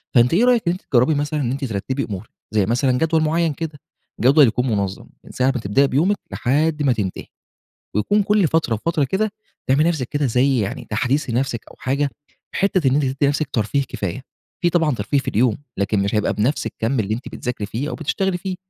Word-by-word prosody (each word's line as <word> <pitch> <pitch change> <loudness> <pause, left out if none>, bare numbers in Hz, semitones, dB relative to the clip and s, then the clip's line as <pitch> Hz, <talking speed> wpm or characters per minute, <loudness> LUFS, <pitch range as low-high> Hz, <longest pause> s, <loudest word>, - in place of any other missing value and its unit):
فأنتِ 120 +2 +5
إيه 210 +8 +4
رأيِك 245 -3 +4
إن - - +4
أنتِ 185 - -7
تجربي 130 +4 +4
مثلًا 150 +1 -1
إن 120 -3 -1
أنتِ 135 +1 -2
ترتبي 125 +5 -2
أمورك؟ 100 +1 -6 0.2
زي 105 -3 +3
مثلًا 125 +5 +1
جدول 160 +2 +2
معين 165 0 +1
كده، 155 -1 -6 0.4
جدول 140 +3 +6
يكون 125 +3 0
منظم 100 -3 -2 0.2
من - - -12
ساعة 130 +1 +2
ما 120 - -2
تبدئي 135 +8 +3
بيومك 180 +10 +2
لحد 150 +4 +1
ما 135 -3 +3
تنتهي 100 -5 -3 0.7
ويكون 205 - +2
كل 200 -4 +3
فترة 160 -8 +1
وفترة 155 +6 0
كده 200 +9 -1 0.4
تعملي 140 +4 +4
لنفْسِك 155 -7 0
كده 145 -1 0
زي 125 +1 +2
يعني 100 - -4
تحديث 125 +6 0
لنفْسِك 120 -1 -1
أو - - -15
حاجة، 140 +2 0 0.4
حتة 185 -7 +2
إن 130 - +2
أنتِ 145 0 +2
تدي 130 0 -2
لنفْسِك 145 +1 0
ترفيه 115 +5 +1
كفاية. 100 +7 -4 0.4
في 175 - +3
طبعًا 165 -5 +2
ترفيه 110 +5 0
في 135 - -4
اليوم، 115 0 +2 0.2
لكن 100 +1 +1
مش 100 +2 -1
هيبقى 105 -1 +1
بنفْس 115 +8 0
الكم 115 +3 -1
اللي 105 0 -1
أنتِ 120 - -7
بتذاكري 120 -4 -4
فيه 120 +8 -3
أو - - -4
بتشتغلي 180 +4 -1
فيه، 185 +1 -4
135 Hz, 210 wpm, -21 LUFS, 115-155 Hz, 0.7 s, جدول